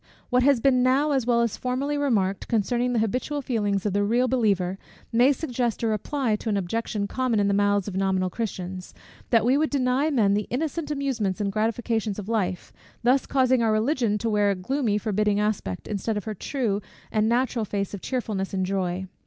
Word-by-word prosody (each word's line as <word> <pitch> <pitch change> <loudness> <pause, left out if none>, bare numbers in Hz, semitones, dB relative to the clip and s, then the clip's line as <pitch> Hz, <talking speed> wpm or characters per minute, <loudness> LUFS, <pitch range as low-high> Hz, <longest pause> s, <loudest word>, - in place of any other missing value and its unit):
What 250 0 +4
has 275 -1 +4
been 255 +1 +3
now 270 +4 +3
as 265 -4 0
well 235 -1 +3
as 235 -3 -1
formerly 265 +3 -1
remarked, 210 -10 0
concerning 240 +2 +1
the 245 - 0
habitual 265 +6 -2
feelings 205 -6 -1
of 205 - 0
the 205 0 +2
real 240 +5 +2
believer, 195 -7 +1 0.3
may 245 +4 +5
suggest 245 -6 -2
a - - +2
reply 225 +2 0
to 225 - -5
an 205 - +1
objection 205 +2 -2
common 245 0 0
in 200 - +2
the 200 - +2
mouths 205 -1 +2
of 195 - -5
nominal 190 -1 0
Christians, 185 -4 -5 0.3
that 230 -2 +4
we 260 +4 +3
would 310 - +1
deny 270 +2 +1
men 220 -9 +3
the 205 0 0
innocent 305 +4 -2
amusements 265 -10 -1
and 200 -1 -1
gratifications 220 0 -1
of 205 -2 -6
life; 190 -5 -2 0.3
thus 255 +3 +3
causing 260 -2 +3
our 225 -1 +2
Religion 225 -1 +1
to 230 - -3
wear 205 -1 +3
a 200 - +1
gloomy 220 +3 0
forbidding 210 0 0
aspect, 210 - -2
instead 210 +1 -2
of 205 - -3
her 215 - -4
true 210 -1 -2 0.3
and 215 0 +2
natural 245 -1 +1
face 200 -1 -3
of 200 - -6
cheerfulness 210 -7 -3
and 190 -1 0
joy. 185 -1 -2
220 Hz, 200 wpm, -25 LUFS, 200-255 Hz, 0.3 s, may